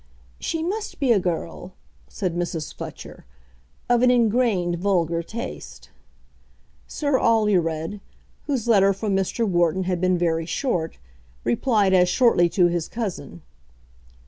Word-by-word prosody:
"She 325 -1 -2
must 415 +5 -4
be 270 -4 +2
a 215 - +5
girl," 175 +1 -4 0.3
said 185 -4 -3
Mrs. 175 -3 -3
Fletcher, - - -9 0.6
"of 245 -1 +3
an 250 - +5
ingrained 225 -7 +2
vulgar 170 -3 +1
taste." 230 +9 -8 1.0
Sir 285 -3 0
Alured, 195 -5 +1 0.5
whose 260 -6 -1
letter 195 -3 +5
from 200 0 -2
Mr. 195 +4 0
Wharton 175 0 +1
had 180 -1 -2
been 185 -1 +2
very 165 -2 0
short, 175 - -2 0.5
replied 200 - +2
as 180 -1 +4
shortly 180 -7 +3
to 180 +1 +3
his 175 -2 0
cousin. 200 -7 -6
190 Hz, 125 wpm, -23 LUFS, 175-230 Hz, 1.0 s, a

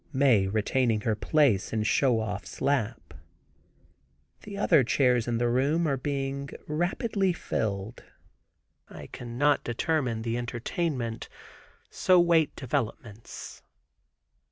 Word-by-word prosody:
Mae 130 -9 +3
retaining 110 +2 +1
her 110 - 0
place 130 -5 +2
in 110 -1 0
Show 120 +1 +2
Off's 105 -2 -6
lap. 120 -5 -1 1.3
The 200 -1 -8
other 150 -8 +4
chairs 125 -1 +2
in 120 -1 0
the 120 +1 +1
room 140 +8 +1
are 140 - +1
being 140 0 -3 0.2
rapidly 185 - 0
filled. 105 - -3 0.9
I - - -10
cannot 125 +5 0
determine 120 -2 -1
the 115 +1 -2
entertainment 120 0 -3 0.6
so 185 -1 +4
wait 170 -3 +3
developments. 120 -4 -5
125 Hz, 110 wpm, -27 LUFS, 115-150 Hz, 1.3 s, other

